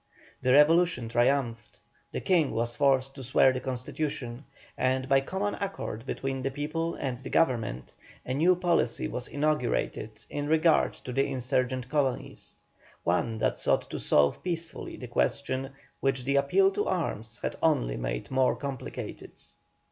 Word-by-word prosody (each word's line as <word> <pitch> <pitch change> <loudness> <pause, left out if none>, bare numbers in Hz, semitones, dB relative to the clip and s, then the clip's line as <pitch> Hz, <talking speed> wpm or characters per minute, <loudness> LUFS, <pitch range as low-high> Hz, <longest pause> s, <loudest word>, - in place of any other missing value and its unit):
The 130 - +3
revolution 160 -3 +5
triumphed, 120 -1 0 0.3
the - - -3
King 170 -7 +3
was 120 +1 -1
forced 135 -1 +2
to 135 - -9
swear 130 +1 +4
the 130 - -2
constitution, 130 0 -4 0.3
and, 130 0 0
by 135 0 +4
common 195 +8 -2
accord 140 - -4
between 135 -1 -3
the 135 - -1
people 155 +4 -2
and 130 -3 -3
the 135 - -8
government, 115 - 0 0.3
a 130 - -2
new 170 +7 +4
policy 170 -10 +1
was 125 - -4
inaugurated 145 -7 0 0.2
in 145 0 -3
regard 160 +1 +3
to 125 - -8
the 135 +2 +2
insurgent 130 0 -1
colonies, 135 -2 -2 0.5
one 110 +6 0
that - - 0
sought - - +1
to - - -3
solve 70 -1 +3
peacefully 170 -2 -4
the 125 - -7
question 135 +2 -1 0.3
which 135 -2 0
the 140 +2 0
appeal 385 - +4
to 415 +1 -1
arms 120 - -2
had - - -2
only - - +2
made - - -4
more 130 -1 +3
complicated. 140 -3 -6
135 Hz, 150 wpm, -28 LUFS, 120-155 Hz, 0.5 s, revolution